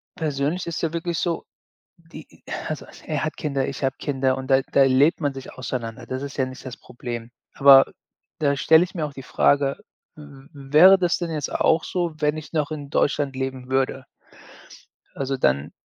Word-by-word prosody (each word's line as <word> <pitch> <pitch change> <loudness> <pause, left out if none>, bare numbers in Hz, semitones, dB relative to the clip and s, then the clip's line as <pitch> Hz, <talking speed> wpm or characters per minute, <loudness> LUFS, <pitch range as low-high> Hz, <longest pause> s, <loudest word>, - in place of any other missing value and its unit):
persönlich 150 +2 -2
ist's 165 - -3
ja 165 -2 -1
wirklich 170 0 -2
so, 170 -2 -2 0.5
die 165 -1 -15 0.3
also - - -5
also, - - -16
er - - -2
hat - - -5
Kinder, 140 -3 -1
ich 140 - -6
habe 135 0 0
Kinder 135 -2 0
und 130 +1 -7
da 135 - +5
da 140 - +5
lebt 140 +7 +3
man 145 -2 0
sich 135 -1 -9
auseinander. 120 -1 -5
Das 130 +1 -4
ist 140 0 -7
ja 130 - +2
nicht 130 0 -10
das 125 - -7
Problem. 120 -2 -8 0.2
Aber 135 -1 +8 0.5
da 140 -2 +2
stelle 160 +4 +5
ich 180 - -15
mir 155 -3 -1
auch 145 - -7
die 135 - -9
Frage: 140 +1 +2 0.4
„W 140 -3 -14
w 140 0 -13
wäre 185 +5 +9
das 175 -2 +1
denn 170 -2 -4
jetzt 150 -3 -3
auch 160 0 +2
so, 175 -3 -2
wenn 150 0 +1
ich 155 - -9
noch 155 -1 -1
in 145 -2 -6
Deutschland 145 -1 +1
leben 130 -1 -5
würde?“ 135 0 0 1.1
Also, 135 0 -2
dann 70 - +1
140 Hz, 195 wpm, -23 LUFS, 130-155 Hz, 1.1 s, wäre